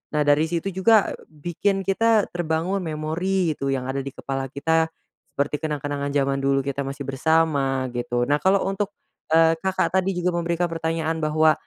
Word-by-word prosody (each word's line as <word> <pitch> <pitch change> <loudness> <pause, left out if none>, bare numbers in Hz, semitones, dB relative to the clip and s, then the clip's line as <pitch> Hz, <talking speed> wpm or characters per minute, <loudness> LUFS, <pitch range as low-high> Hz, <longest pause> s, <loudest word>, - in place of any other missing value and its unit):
Nah 150 - +3
dari 145 +2 +4
situ 170 +3 -2
juga 200 +3 +4 0.2
bikin 175 +6 -2
kita 215 +2 +2
terbangun 175 +3 -1
memori 165 +2 -1
gitu 140 - -3
yang 130 0 -3
ada 135 +1 -1
di 135 - -6
kepala 135 -1 -3
kita, 160 +4 +1 0.5
seperti 145 +1 0
kenang-kenangan 145 -2 -2
jaman 140 -1 +1
dulu 135 0 +2
kita 140 0 -2
masih 140 0 -5
bersama 135 -2 +1
gitu, 120 0 -1
nah 145 - +4
kalau 190 +1 +3
untuk, 195 +1 -2 0.4
eee, 165 0 +6
Kakak 190 -1 0
tadi 190 0 +2
juga 180 0 0
memberikan 170 0 0
pertanyaan 165 0 -2
bahwa, 155 0 +4
160 Hz, 165 wpm, -23 LUFS, 140-180 Hz, 0.5 s, eee